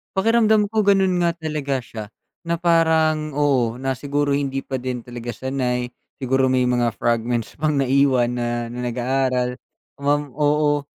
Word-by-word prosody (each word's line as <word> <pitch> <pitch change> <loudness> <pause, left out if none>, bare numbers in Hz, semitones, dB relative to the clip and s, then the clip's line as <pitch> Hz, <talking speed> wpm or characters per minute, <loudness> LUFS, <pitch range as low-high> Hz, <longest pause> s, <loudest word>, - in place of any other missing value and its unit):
Pakiramdam 220 0 +3
ko 215 -1 +2
gano'n 190 -3 +3
nga 170 - +3
talaga 150 -5 -3
siya, 110 -2 -7 0.4
na 170 - +1
parang, 160 -3 +2
oo, 130 -6 +1
na 135 +1 -2
siguro, 145 0 -1
hindi 135 -1 -1
pa 130 -2 -4
din 125 -2 -4
talaga 120 -1 -6
sanay. 125 -2 -2 0.3
Siguro, 130 +1 +2
may 130 -1 +2
mga 120 -2 +1
fragments 115 0 -1
pang 155 -1 +1
naiwan 130 -2 +3
na, 120 -1 -3
na, 125 - -6
nag-aaral. 125 0 -1 0.4
Kumam 145 0 0
oo, 145 0 +1
135 Hz, 150 wpm, -21 LUFS, 125-150 Hz, 0.4 s, Pakiramdam